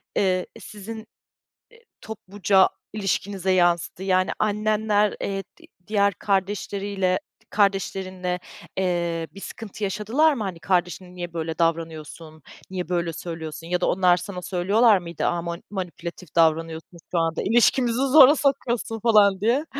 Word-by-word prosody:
eee, 185 -2 +1
sizin 220 +2 -9 0.9
topluca 200 -2 +1 0.2
ilişkinize 195 -2 -1
yansıdı? 175 0 +1
Yani, 185 -1 +2
annenler, 210 0 +1
eee, 195 0 -2 0.2
di - - -16 0.2
diğer 200 -1 +2
kardeşleriyle, 195 0 -1 0.3
kardeşlerinle, 190 -2 0 0.4
eee, 170 -3 -1
bir 195 - -11
sıkıntı 215 -1 -8
yaşadılar 220 +11 +2
mı? 235 -6 -3
Hani, 185 -4 -5
“Kardeşine 180 +1 -1
niye 175 -1 -6
böyle 160 -1 -4
davranıyorsun, 160 -1 -3 0.3
niye 180 -2 -5
böyle 170 -2 -1
söylüyorsun?” 165 -1 -7
ya 180 +1 -1
da - - +2
onlar 180 -1 +4
sana 180 0 -6
söylüyorlar 200 +5 +3
mıydı, 170 -2 -5
“A, 170 -1 0
mani 170 0 -6
manipülatif 180 -3 -7
davranıyorsun, 165 +1 +1
şu 175 - +1
anda 165 0 0
ilişkimizi 240 +2 +3
zora 280 +1 +8
sokuyorsun, 245 -6 -1
falan” 205 -4 +4
diye. 245 +8 +2
190 Hz, 125 wpm, -24 LUFS, 175-210 Hz, 0.9 s, zora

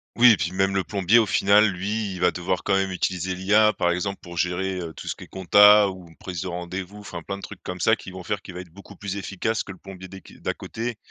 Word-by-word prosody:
Oui 120 0 +8
et 100 - 0
puis 85 +1 -2
même 95 +1 +1
le 95 - +1
plombier 100 +3 +2
au 115 - +3
final 100 +3 +4
lui 100 +2 -3
il 90 - -7
va 90 0 +4
devoir 90 -1 -2
quand 100 - 0
même 95 0 +1
utiliser 90 0 -2
l'IA 105 +3 +4
par 85 -1 +1
exemple 100 +3 -2
pour 85 -1 -10
gérer, 90 +2 -1
heu, 80 -2 -6
tout - - -10
ce - - -2
qui - - -11
est - - -13
comptabilité, 105 +2 +6
ou 95 -2 -10
prise 90 -3 -6
de - - -4
rendez-vous. 90 +3 -6
Enfin 85 -4 -8
plein 100 0 -5
de - - -12
trucs 100 - -9
comme 90 0 -6
ça 110 - +4
qui 95 - -11
vont 95 -1 -9
faire 105 +1 -3
qu'il 90 - -10
va 90 - -5
être 90 - -13
beaucoup 100 - -13
plus 100 -1 -5
efficace 100 +2 -2
que 95 - -9
le 95 - -11
plombier 95 0 -11
des 95 0 -11
qui - - -16
d'à - - -1
côté, 115 0 -5
95 Hz, 280 wpm, -24 LUFS, 90-100 Hz, -, Oui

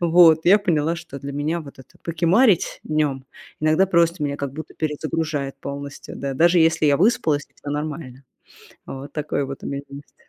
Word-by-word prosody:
Вот 165 -2 +6
я 200 +4 +7
поняла, 165 -5 +1
что 165 -5 -9
для 140 +1 -6
меня 150 +4 -1
вот 140 -4 -12
это 130 - -16
покемарить 170 +5 +2
днем- 150 -4 -1 0.4
иногда 155 +5 +3
просто 170 -2 +2
меня 140 -1 -1
как 140 -2 -4
будто 155 +2 -8
перезагружает 150 -2 -2
полностью, 140 +1 -7
да, 140 -1 -4
даже 170 +4 +4
если 160 -1 +3
я 145 -1 +4
выспалась 160 -8 +2
и - - -37
всё 145 - -8
нормально. 145 -3 -5 0.6
Вот 135 +1 -8
такое 150 -2 -2
вот 135 0 -8
у - - -4
меня 140 0 -3
есть. 140 +1 -12
155 Hz, 180 wpm, -22 LUFS, 140-165 Hz, 0.6 s, я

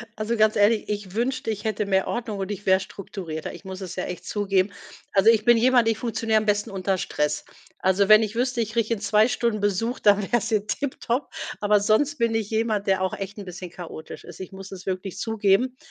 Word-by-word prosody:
Also, 220 +2 -2
ganz 215 0 +4
ehrlich, 210 +2 +3
ich 205 -3 -4
wünschte, 255 +2 -1
ich 210 -1 -3
hätte 215 -2 -1
mehr 190 -1 +1
Ordnung 225 -3 -3
und 195 +1 -3
ich 205 0 -6
wäre 190 0 +5
strukturierter, 185 -5 -7
ich - - -12
muss 190 0 -7
es 185 -2 -6
ja 185 - -2
echt 180 - -7
zugeben. 195 -1 +1 0.4
Also, 195 +2 +5
ich 220 -2 +1
bin 240 -1 +6
jemand, 245 0 +4
ich 225 -2 +2
funktioniere 225 -1 0
am 215 - +1
besten 205 -1 +1
unter 190 0 -1
Stress. 150 -4 -1 0.4
Also, 190 +1 +2
wenn 215 +1 +8
ich 220 0 -3
wüsste, 250 -1 0
ich 220 - -2
kriege 230 -1 +1
in 205 - -5
2 210 +2 +4
Stunden 235 -3 0
Besuch, 205 +5 0
dann 205 -1 +4
wäre 225 +4 +1
es 225 0 -3
hier 215 -3 +1
tipptopp, 260 +1 -2 0.3
aber 210 0 +3
sonst 225 +9 +2
bin 230 -2 +1
ich 215 -2 -1
jemand, 220 -2 0
der 190 -1 +2
auch 190 - 0
echt 195 +1 -6
'n 205 - -7
bisschen 180 -1 -8
chaotisch 170 -3 -9
ist, 175 - -11
ich 185 - -7
muss 195 0 -10
es 185 -2 -9
wirklich 185 0 -4
zugeben. 225 +3 +1
210 Hz, 230 wpm, -24 LUFS, 190-225 Hz, 0.4 s, wenn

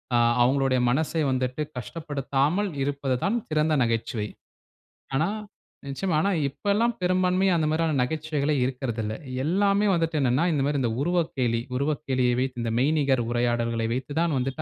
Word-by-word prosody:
அ - - +5 0.3
அவங்களுடைய 135 0 +2
மனசை 160 +5 0
வந்துட்டு 130 +2 -1 0.2
கஷ்டப்படுத்தாமல் 145 - -1 0.2
இருப்பதுதான் 140 - -1
சிறந்த 155 0 +1
நகைச்சுவை. 115 -2 -1 0.9
ஆனா 155 +6 +2 0.6
நிச்சயமா. 155 +6 -1
ஆனா, 200 - +1 0.2
இப்பல்லாம் 205 - 0
பெரும்பான்மையா 185 +1 +2
அந்த 155 -2 +1
மாரியான 160 -1 +1
நகைச்சுவைகளே 150 +2 -1
இருக்குறதில்ல. 120 -4 -2 0.3
எல்லாமே 200 +5 +2
வந்துட்டு 165 -2 0
என்னவென்னா 130 +4 +2
இந்த 145 -3 +1
மாரி 145 0 0
இந்த 120 - +1
உருவக்கேளி 140 -8 0 0.2
உருவக்கேளிய 135 -3 0
வைத்து 130 -2 -2
இந்த 115 -1 -1
மெய்நிகர் 140 -2 +2
உரையாடல்களை 120 -1 0
வைத்து 130 +3 -4
தான் 165 -3 +1
வந்துட்டு 135 +4 -2
140 Hz, 130 wpm, -26 LUFS, 125-165 Hz, 0.9 s, அ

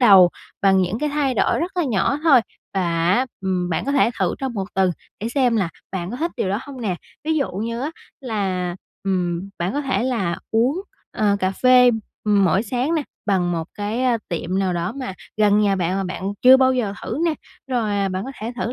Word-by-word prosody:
đầu 195 -7 +8 0.3
bằng 190 -1 +5
những 185 +5 -1
cái 300 - 0
thay 285 -3 0
đổi - - +2
rất 365 +3 -3
là 350 - +2
nhỏ 260 +3 +1
thôi 275 -6 +7 0.3
và 190 - +1 0.3
á, 250 +7 +3
ừm, 185 -2 -1
bạn 160 - -1
có 280 - -1
thể 260 -4 +4
thử 185 -3 +1
trong 265 -2 -3
1 195 - -2
tuần 190 -1 +3 0.3
để 225 - -2
xem 245 -3 +2
là 190 -5 +1 0.2
bạn 180 0 -3
có 245 - -4
thích 335 +4 -1
điều 185 - -1
đó 200 - 0
hông 270 -3 -9
nè. 195 -6 -1 0.3
Ví 320 - +1
dụ 280 - 0
như 230 +5 -3
á 290 - -2 0.3
là, 190 -8 -2 0.3
ừm, 180 -1 -1
bạn 175 +4 -1
có 290 - -1
thể 270 -4 0
là 220 -10 0
uống, 255 +11 +2 0.3
ờ, 205 -2 +2
cà 185 - +2
phê, 250 +4 +6 0.3
ừm, 205 -2 +4
mỗi 190 +3 +3
sáng 250 +7 -1
nè, 315 - +1 0.2
bằng 185 -4 +1
một 165 -1 -2
cái, 210 +5 -2
ơ, 245 -2 +3
tiệm 175 +2 -2
nào 190 -2 +1
đó 175 +4 -2
mà 255 -8 -4 0.2
gần 210 0 +4
nhà 200 -2 +2
bạn 180 0 0
mà 195 - -1
bạn 185 0 -5 0.2
chưa 260 +1 +9
bao 260 0 +4
giờ 225 -6 0
thử - - -3
nè. 330 - +2 0.4
Rồi, 235 -4 0
à, 200 -1 +1
bạn 185 +1 -3
có 270 - -5
thể 225 +3 -4
thử 240 0 -2
210 Hz, 230 wpm, -22 LUFS, 190-255 Hz, 0.4 s, chưa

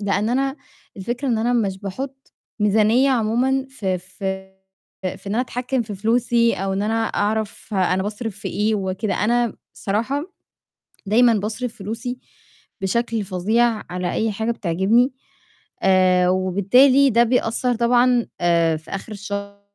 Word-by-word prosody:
لإن 205 +1 0
أنا 270 +3 0 0.4
الفكرة 240 +7 -3
إن 230 - +1
أنا 235 +2 +1
مش 200 -6 0
باحط 265 +7 -7 0.3
ميزانية 220 +6 +3
عمومًا 255 +3 +1
في 195 -9 -2
في 190 +1 -6 0.7
في - - -19
إن 200 - -2
أنا 235 - +2
أتحكّم 255 0 -2
في 210 -2 -7
فلوسي 230 +2 +2
أو 195 0 -2
إن 195 +1 -1
أنا 225 +2 0
أعرف 215 0 -2
أنا 185 0 +1
باصرف 210 +1 -4
في - - -5
إيه 215 +1 0
وكده، 195 +1 -2
أنا 235 +1 +1 0.2
الصراحة 265 - -2 0.7
دايمًا 230 +4 +4
باصرف 220 +3 -3
فلوسي 230 +5 -5 0.6
بشكل 225 +3 0
فظيع 215 +5 +1
على 180 0 -2
أي 220 0 0
حاجة 220 +3 -1
بتعجبني، 210 +7 +2 0.7
آآ 185 -1 +4
وبالتالي 200 +10 +4
ده 235 +2 +5
بيأثّر 245 +1 +1
طبعًا 240 +1 +3
آآ 170 -2 +3
في 155 - -14
آخر 195 +3 -6
الشهر 200 0 -6
220 Hz, 140 wpm, -21 LUFS, 195-240 Hz, 0.7 s, ده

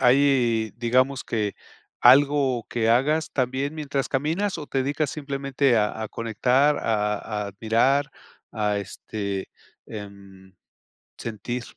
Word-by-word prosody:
Hay, 125 -4 +3
digamos 130 +3 +1
que 105 -3 -2 0.5
algo 135 -1 +5
que 115 -2 0
hagas 145 +7 +2
también 135 +3 -1
mientras 145 -3 -2
caminas 165 +9 -1
o 150 -3 -8
te 135 - -1
dedicas 145 +2 0
simplemente 140 -3 0
a 105 0 0
a 110 - -2
conectar, 125 +7 +1
a 105 -1 -1
admirar, 115 +8 +1 0.4
a 105 -2 0
este, 100 0 -5 0.4
em, 100 -2 -11 0.6
sentir. 120 +2 -5
125 Hz, 110 wpm, -24 LUFS, 105-140 Hz, 0.6 s, algo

